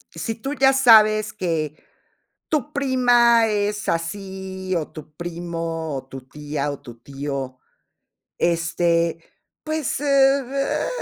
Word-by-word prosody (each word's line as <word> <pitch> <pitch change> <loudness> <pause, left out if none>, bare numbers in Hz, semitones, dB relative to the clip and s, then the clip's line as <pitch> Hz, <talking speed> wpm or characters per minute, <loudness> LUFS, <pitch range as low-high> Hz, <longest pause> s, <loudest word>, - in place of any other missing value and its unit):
Si 220 +7 -3
tú 270 +5 -5
ya 270 -2 +4
sabes 215 -5 +6
que 160 -6 -3 0.7
tu 300 -1 -1
prima 245 -4 +4
es 205 0 -1
así, 190 +2 -3
o 160 -3 -2
tu 155 -1 -12
primo, 165 -2 -4
o 130 0 -7
tu 135 -1 -9
tía, 145 +2 -4
o 140 - -8
tu 120 -4 -12
tío, 135 -1 -5 0.8
este, 170 0 +1 0.4
pues, 310 -4 -2
ah, 275 -1 +2
185 Hz, 115 wpm, -22 LUFS, 160-240 Hz, 0.8 s, sabes